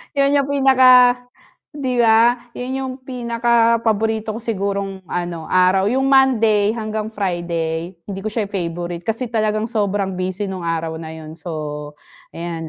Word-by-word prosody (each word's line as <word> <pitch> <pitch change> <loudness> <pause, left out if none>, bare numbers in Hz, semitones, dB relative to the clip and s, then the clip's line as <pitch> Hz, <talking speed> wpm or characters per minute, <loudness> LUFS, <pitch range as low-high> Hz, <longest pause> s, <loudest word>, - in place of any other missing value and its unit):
'yon 280 0 +3
'yong 280 -1 +2
pinaka 265 -2 +5 0.8
'di 270 -4 -3
ba? 235 +2 +3
'Yon 255 +1 -4
'yong 260 -1 -4
pinakapaborito 230 -3 +1
ko - - -6
sigurong 200 -3 -3
ano, 175 -2 -4
araw. 185 +2 +3
Yung 265 +4 +1
Monday 225 -6 +4
hanggang 215 -1 -3
Friday, 170 -3 -3
hindi 195 -1 -6
ko 215 - -3
siya 215 0 -2
yung 200 - -12
favorite 175 -1 -4
kasi 225 +3 -1
talagang 215 -1 0
sobrang 200 -3 -1
busy 185 +2 -2
no'ng 185 -2 -6
araw 165 -1 -2
na 160 -1 -7
'yon. 155 -1 -9
So 150 -3 -6 0.4
ayan, 165 -1 -5
205 Hz, 145 wpm, -20 LUFS, 175-235 Hz, 0.8 s, pinaka